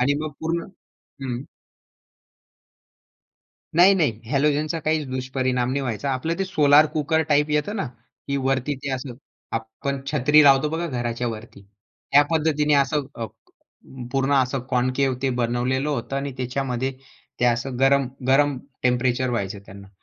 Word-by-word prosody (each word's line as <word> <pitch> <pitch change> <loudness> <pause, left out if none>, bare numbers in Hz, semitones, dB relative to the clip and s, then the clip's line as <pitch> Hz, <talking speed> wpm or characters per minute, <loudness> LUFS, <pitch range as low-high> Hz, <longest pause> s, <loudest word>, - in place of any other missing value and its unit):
आणि 140 +3 +3
मग 155 - -3
पूर्ण 165 +1 -1 0.6
हं. 125 -1 -3 2.3
नाही-नाही 175 - +4
हॅलोजनचा 150 +3 +1
काहीच 155 -1 -1
दुष्परिणाम 130 -1 -1
नाही 140 +1 -1
व्हायचा. 130 +2 -3
आपलं 145 +6 -2
ते 195 - +1
सोलार 150 -4 +5
कुकर 160 +1 +1
टाईप 150 +1 +3
येतं 150 +8 0
ना, 195 - -2 0.4
की 140 0 0
वरती 135 +1 0
ते 140 - -3
असं 130 0 -5 0.4
आपण 115 +5 -4
छत्री 150 +1 +5
लावतो 140 +1 +5
बघा 165 +2 -2
घराच्यावरती. 120 -4 -4 0.5
त्या 145 +1 +7
पद्धतीने 150 -2 +2
असं 140 +1 +2
अ, 115 - -4 0.9
पूर्ण 135 +1 +1
असं 130 +1 -3
कॉनकेव्ह 130 +1 +1
ते 135 - +1
बनवलेलं 125 +3 0
होतं 135 -1 -3
आणि 140 0 -2
त्याच्यामध्ये 130 0 -2 0.5
ते 125 - +3
असं 120 +2 0
गरम, 135 0 +4 0.2
गरम 140 +1 +3 0.3
टेम्परेचर 125 0 +1
व्हायचं 100 -3 -3
त्यांना. 100 0 -12
135 Hz, 135 wpm, -23 LUFS, 125-150 Hz, 2.3 s, त्या